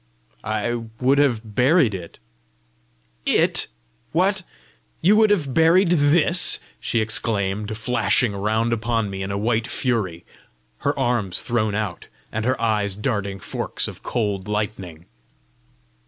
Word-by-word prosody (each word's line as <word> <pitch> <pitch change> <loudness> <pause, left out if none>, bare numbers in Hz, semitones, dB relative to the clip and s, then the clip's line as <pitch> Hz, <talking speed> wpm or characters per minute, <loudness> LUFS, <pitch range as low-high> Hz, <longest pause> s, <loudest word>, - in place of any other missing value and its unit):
"I 110 +2 -1 0.3
would 135 +2 +3
have 115 -6 0
buried 130 - +3
it." 90 -3 -8 1.1
"It! - - +3 0.5
What? 190 +4 +2 0.6
You 195 +6 +4
would 215 -1 +5
have 155 -10 +1
buried 165 +4 +4
THIS?" 170 +2 +4 0.2
she 115 - -1
exclaimed, 105 -1 -1
flashing 120 -1 +1
round 110 +4 0
upon 115 -2 -1
me 95 0 -5
in 95 - -4
a 100 - -2
white 110 +2 0
fury, 105 -12 -2 0.5
her - - -1
arms 120 -8 +1
thrown 110 -3 0
out, 105 -4 -4 0.2
and 110 0 -3
her 130 0 0
eyes 105 -4 +1
darting 105 -3 -2
forks 90 - -3
of - - -9
cold 105 -5 -2
lightning. 100 -6 -4
110 Hz, 125 wpm, -22 LUFS, 105-130 Hz, 1.1 s, would